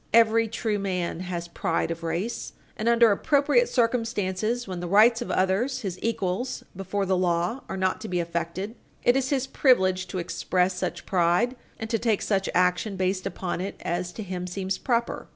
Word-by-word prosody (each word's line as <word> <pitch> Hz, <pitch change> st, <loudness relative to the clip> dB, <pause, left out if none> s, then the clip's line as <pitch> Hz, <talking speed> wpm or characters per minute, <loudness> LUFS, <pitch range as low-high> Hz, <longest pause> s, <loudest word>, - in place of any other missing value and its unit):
Every 230 Hz, 0 st, +5 dB
true 215 Hz, -1 st, -2 dB
man 180 Hz, -4 st, -2 dB
has 175 Hz, -2 st, -4 dB
pride 165 Hz, -1 st, -1 dB
of 165 Hz, 0 st, -5 dB
race, 170 Hz, +8 st, -3 dB, 0.2 s
and, 220 Hz, +2 st, 0 dB
under 235 Hz, -1 st, +6 dB
appropriate 290 Hz, -, +3 dB
circumstances, 230 Hz, -2 st, 0 dB
when 185 Hz, -2 st, -4 dB
the 175 Hz, -, -4 dB
rights 220 Hz, +5 st, +5 dB
of 240 Hz, -, -4 dB
others, 220 Hz, +8 st, +1 dB
his 185 Hz, -5 st, -4 dB
equals 225 Hz, +1 st, -2 dB
before 195 Hz, +1 st, -2 dB
the 190 Hz, 0 st, +2 dB
law, 180 Hz, +6 st, 0 dB
are -, -, -3 dB
not 185 Hz, 0 st, 0 dB
to 220 Hz, -, -5 dB
be 180 Hz, -2 st, -1 dB
affected, 170 Hz, +4 st, -3 dB, 0.3 s
it 245 Hz, -, +4 dB
is 265 Hz, -1 st, +1 dB
his 270 Hz, -2 st, +1 dB
privilege 190 Hz, -9 st, +3 dB
to 185 Hz, -, -5 dB
express 180 Hz, +1 st, 0 dB
such 180 Hz, -, -4 dB
pride 180 Hz, +7 st, +2 dB, 0.2 s
and 225 Hz, -, -5 dB
to 225 Hz, -, +1 dB
take 225 Hz, -3 st, +1 dB
such 195 Hz, -2 st, 0 dB
action 180 Hz, +3 st, +2 dB
based 185 Hz, 0 st, -1 dB
upon 180 Hz, -2 st, -3 dB
it 195 Hz, -, -4 dB
as 175 Hz, +1 st, -2 dB
to 220 Hz, -, -6 dB
him 180 Hz, -2 st, -4 dB
seems 190 Hz, +1 st, -3 dB
proper. 235 Hz, -2 st, -1 dB
195 Hz, 185 wpm, -26 LUFS, 180-230 Hz, 0.3 s, under